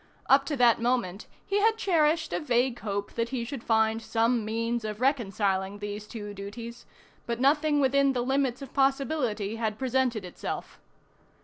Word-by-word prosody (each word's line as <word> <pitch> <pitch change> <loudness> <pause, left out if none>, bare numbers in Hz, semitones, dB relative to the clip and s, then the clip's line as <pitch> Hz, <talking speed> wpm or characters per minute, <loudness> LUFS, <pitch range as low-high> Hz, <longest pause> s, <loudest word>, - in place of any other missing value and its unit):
Up 275 +1 +5
to 295 - -1
that 240 -2 +4
moment 235 -6 -1 0.2
he 400 +1 +1
had 445 +1 +3
cherished 325 -5 +2
a - - 0
vague 245 -4 +1
hope 205 -1 -4
that 230 0 -1
he 250 -3 -3
should 245 -1 -6
find 220 0 +2
some 230 +1 +1
means 230 +2 -2
of 215 -1 -4
reconciling 200 -7 0
these 205 +1 -6
two 205 -3 -7
duties, 230 +4 -8 0.4
but 235 0 -2
nothing 295 +2 +3
within 275 0 +3
the 245 -1 -1
limits 265 0 0
of 270 - -11
possibility 270 -6 0
had 220 -2 -2
presented 250 -4 0
itself. 180 - -6
240 Hz, 165 wpm, -28 LUFS, 215-270 Hz, 0.4 s, Up